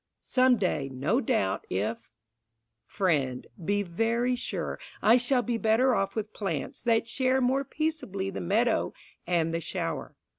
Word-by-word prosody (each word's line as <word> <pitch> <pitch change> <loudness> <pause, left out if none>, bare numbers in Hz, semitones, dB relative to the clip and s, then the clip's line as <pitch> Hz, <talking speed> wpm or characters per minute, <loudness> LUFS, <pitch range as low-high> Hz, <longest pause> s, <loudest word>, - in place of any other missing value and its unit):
Some 255 -1 +4
day, 175 -8 -1
no 150 - +1
doubt, 95 - 0
if... 110 +5 -2 0.8
Friend, 145 -10 0 0.2
be 205 +4 +1
very 230 +7 0
sure 245 - -3 0.2
I 225 +3 +6
shall 245 0 +2
be 235 -1 -1
better 235 +4 +3
off 195 -3 0
with 215 -1 -3
plants 165 -10 -3
that 230 -1 +2
share 260 +2 +2
More 260 +2 +2
peaceably 275 - -3
the - - -5
meadow 220 +6 +1 0.3
and 165 -2 +1
the 165 - -1
shower. - - -4
215 Hz, 145 wpm, -28 LUFS, 170-245 Hz, 0.8 s, I